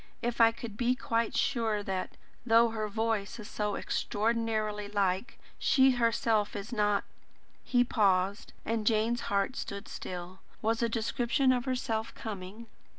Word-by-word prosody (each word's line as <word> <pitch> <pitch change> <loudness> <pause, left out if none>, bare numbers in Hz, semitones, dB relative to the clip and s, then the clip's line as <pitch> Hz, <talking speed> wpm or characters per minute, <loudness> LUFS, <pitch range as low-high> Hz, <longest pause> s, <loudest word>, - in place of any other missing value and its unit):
If 240 0 0
I 225 0 +7
could 225 -2 -8
be 245 +1 +2
quite 230 -2 -1
sure 220 -5 +1
that, 190 -2 -4 0.3
though 230 -1 +5
her 220 -1 -2
voice 220 -1 -1
is 210 - -7
so 210 -1 -2
extraordinarily 215 -1 -1
like, 200 +4 -1 0.2
she 265 -1 +5
herself 230 -3 +1
is 205 +4 -5
not 205 -2 +2 0.3
" - - -36
he 245 -1 +5
paused, 200 -3 +1
and 225 -2 -1
Jane's 230 +1 +2
heart 200 +5 +1
stood 200 -3 -5
still. 180 +1 -7 0.2
Was 225 +2 0
a 235 - +2
description 240 +4 +1
of 245 -1 0
herself 240 -4 -2
coming? 205 +1 -7
225 Hz, 150 wpm, -30 LUFS, 205-235 Hz, 0.3 s, I